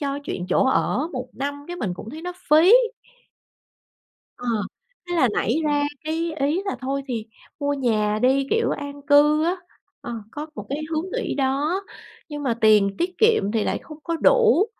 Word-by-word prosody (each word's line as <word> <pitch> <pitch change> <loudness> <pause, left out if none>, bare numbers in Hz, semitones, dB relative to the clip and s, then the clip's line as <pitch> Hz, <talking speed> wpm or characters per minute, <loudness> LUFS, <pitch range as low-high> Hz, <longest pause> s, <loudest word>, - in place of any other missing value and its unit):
cho 280 -1 -2
chuyện 180 -10 -4
chỗ - - +3
ở 265 +3 +1
1 255 -2 -5
năm 285 +1 -4
cái 350 - -5
mình 200 - -3
cũng 215 +5 -9
thấy 315 +3 -9
nó 360 +1 -4 0.2
phí. 320 +6 +7 1.7
Ờ, 245 - -7 0.6
thế 350 - -1
là 310 -7 +4
nảy 230 - +1
ra 290 -1 +2 0.2
cái 325 +1 -2
ý 295 +7 +1
là 390 - -2
thôi 275 +1 -2
thì, 230 -4 -3 0.3
mua 285 0 0
nhà 215 -6 +1
đi, 270 +2 +3
kiểu, 455 0 +2
an 285 0 -5
cư 295 +1 +5
á. 345 +3 +1 0.5
Ờ, 240 - -6 0.2
có 300 +1 -6
một 210 - -7
cái 280 +2 -2
hướng 315 +2 -1
nghĩ - - -2
đó, 285 +7 0 0.5
nhưng 295 -1 -5
mà 255 -4 +1
tiền 210 -2 +5
tiết 360 +1 -2
kiệm 440 - +3
thì 220 -2 +1
lại - - -1
không 305 - -11
có 335 - -2
đủ 450 0 +4
285 Hz, 185 wpm, -23 LUFS, 255-325 Hz, 1.7 s, phí